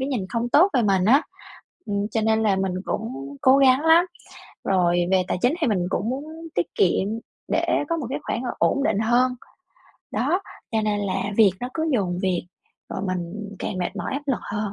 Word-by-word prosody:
cái 265 - -1
nhìn 235 -9 -2
không 235 0 -2
tốt 345 +10 +5
về 245 - +3
mình 190 -3 +2
á. 270 +8 +5 0.6
Ừm, 200 0 -1
cho 225 - 0
nên 220 0 +2
là 200 -3 +2
mình 190 -1 -1
cũng 140 -10 -5
cố 260 +1 +6
gắng 265 -1 +5
lắm. 325 +3 +5 0.6
Rồi, 175 -2 +2
về 190 -1 +4
tài - - -1
chính 250 +6 +3
thì - - +2
mình 190 -6 +1
cũng 210 - -1
muốn 275 +3 -3 0.3
tiết 175 - +1
kiệm 190 +1 +2 0.4
để - - +1 0.2
có 335 - 0
một 285 -7 -4
cái - - -2
khoản 235 - -2 0.2
ổn 275 - +2
định 205 - +1
hơn. 240 +3 +3 0.8
Đó, 365 - 0 0.3
cho 220 -1 +1
nên 210 -1 0
là 195 -2 -1 0.2
việc 205 -4 +6
nó 245 - -4
cứ 320 0 -1
dồn 180 -6 0
việc, 180 -2 -1 0.5
rồi - - -3
mình 175 -2 -3 0.3
càng - - -3
mệt 180 - -3
mỏi - - -4
áp 280 - -2
lực 270 - +1
hơn 210 0 -3
220 Hz, 210 wpm, -23 LUFS, 185-260 Hz, 0.8 s, cố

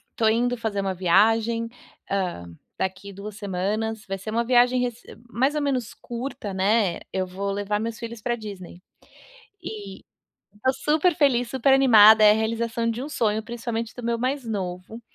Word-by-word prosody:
tô 225 - +2
indo 240 +3 +2
fazer 220 -3 -2
uma 195 -1 -1
viagem, 225 +6 +2 0.4
hã, 185 - -2 0.3
daqui 190 +1 -3
2 200 +1 -8
semanas, 210 +2 -3
vai 195 0 -4
ser 200 - -10
uma 230 +2 0
viagem 250 +1 +4
rece 245 -1 -4 0.2
mais 265 +5 +1
ou 300 - -1
menos 255 -5 -2
curta, 240 -3 -6
né, 195 -1 +1
eu 190 -1 -1
vou 195 +2 -4
levar 205 +1 -2
meus 225 0 -4
filhos 230 -1 -7
para 240 +2 -1
Disney. 195 -5 -9 0.8
E 205 - -8 0.6
tá 260 - +4
super 310 +5 +1
feliz, 250 -6 +2
super 265 +1 +2
animada, 220 -5 +7
é 210 - +8
a - - +6
realização 230 +1 -1
de 230 +2 -5
um - - -5
sonho, 220 -6 0
principalmente 230 -1 -4
do 245 - -8
meu 235 0 0
mais 260 +2 -1
novo. 190 +1 -5
225 Hz, 170 wpm, -24 LUFS, 200-240 Hz, 0.8 s, é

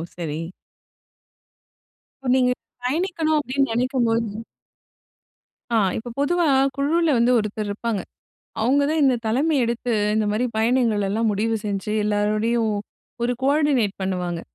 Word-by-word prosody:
சரி. 160 -2 -4 1.8
இப்ப, 265 - -3
நீங்க 250 -1 +3 0.3
பயணிக்கணும் 320 +1 0
அப்டின்னு 275 0 0
நெனைக்கும் 250 +1 +1
போது 225 -1 -1 1.3
ஆ, - - +2 0.2
இப்ப 240 +2 -6
பொதுவா 340 +4 +2 0.3
குழுவுல 315 +4 +2
வந்து 235 +2 +3
ஒருத்தர் 210 0 -3
இருப்பாங்க. 210 0 -2 0.6
அவுங்க 265 +6 +3
தான் 315 0 +1
இந்த 265 -2 +4
தலைமை 280 +8 +1
எடுத்து, 235 +1 -2 0.2
இந்த 215 0 +1
மாரி 220 +4 0
பயணங்கள் 225 -3 +2
எல்லாம் 220 +2 +1
முடிவு 225 +3 0
செஞ்சி, 205 0 -2
எல்லாரோடையும் 215 +2 +1 0.5
ஒரு 245 - +1
கோஆர்டினேட் 275 -7 +2
பண்ணுவாங்க. 180 -3 -2
235 Hz, 120 wpm, -23 LUFS, 210-275 Hz, 1.8 s, இந்த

